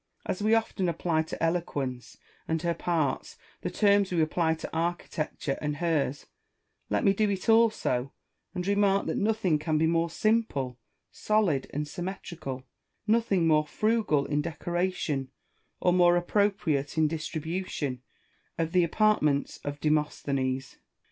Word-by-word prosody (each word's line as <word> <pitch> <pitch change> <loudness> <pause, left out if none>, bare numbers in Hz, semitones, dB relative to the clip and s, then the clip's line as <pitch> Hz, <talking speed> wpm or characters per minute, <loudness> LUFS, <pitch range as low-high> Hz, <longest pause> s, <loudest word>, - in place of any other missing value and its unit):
As 185 - -3
we 215 +2 +4
often 215 -5 0
apply 165 -1 0
to 160 - -5
Eloquence 145 -7 -2 0.3
and 160 0 0
her 170 0 +1
parts 160 -6 -1 0.2
the - - -2
terms 200 -2 +3
we 175 - +1
apply 160 +1 +2
to 160 - -8
Architecture 165 -4 -2
and 150 -1 -1
hers, 150 -4 -1 0.6
let - - +1
me 195 -4 +5
do 210 +1 +1
it 195 -2 -3
also, 220 - +3 0.4
and 180 -1 -2
remark 200 0 +2
that - - -2
nothing 205 -7 +1
can 155 0 0
be 160 - +3
more 165 +1 +2
simple, 165 - 0 0.3
solid, 200 -11 +1
and 150 +1 -2
syuimetrical, 170 -5 -6 0.4
nothing 215 -5 +2
more 155 -1 +3
frugal 215 -9 +1
in 150 0 0
decoration 170 -4 -2 0.5
or 180 - +3
more 175 -1 +5
appropriate 175 -6 0
in 155 -1 +4
distribution, 160 -3 -3 0.6
than 165 -1 -1
the 180 0 +4
apartments 170 -6 +2
of 145 0 -4
Demosthenes. 140 -4 -1
165 Hz, 135 wpm, -28 LUFS, 150-195 Hz, 0.6 s, me